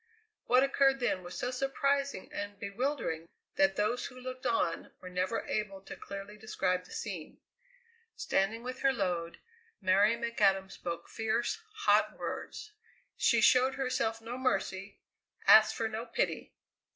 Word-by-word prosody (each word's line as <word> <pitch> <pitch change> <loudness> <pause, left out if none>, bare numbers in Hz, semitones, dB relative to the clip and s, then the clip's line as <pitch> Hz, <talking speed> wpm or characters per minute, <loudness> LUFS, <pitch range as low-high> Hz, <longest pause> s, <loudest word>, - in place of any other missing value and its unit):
What 250 +2 +5
occurred 275 0 +3
then 240 -7 0
was 175 0 -8
so 245 - -2
surprising 275 -1 -1
and 205 0 -5
bewildering 200 - -2 0.3
that 195 0 +3
those 215 +5 0
who 255 - -12
looked 255 0 -5
on 225 -7 0
were 185 - -9
never 185 +5 -1
able 210 -2 -2
to - - -9
clearly 200 +1 -8
describe 185 -4 -1
the - - -16
scene. 185 -8 -6 0.8
Standing 215 +4 0
with 255 +1 -5
her 270 - +4
load, 175 -7 -2 0.4
Mary 200 +3 +4
McAdam 200 -5 +1
spoke 170 -3 -5
fierce, 230 - -1 0.3
hot - - +4
words. 425 - -6 0.4
She 235 -2 +3
showed 255 +3 +5
herself 230 -4 -1
no 240 +3 -6
mercy, 195 -5 -1 0.5
asked 215 0 +8
for 225 - -1
no 220 +2 -5
pity. 230 - -2
220 Hz, 140 wpm, -31 LUFS, 195-250 Hz, 0.8 s, asked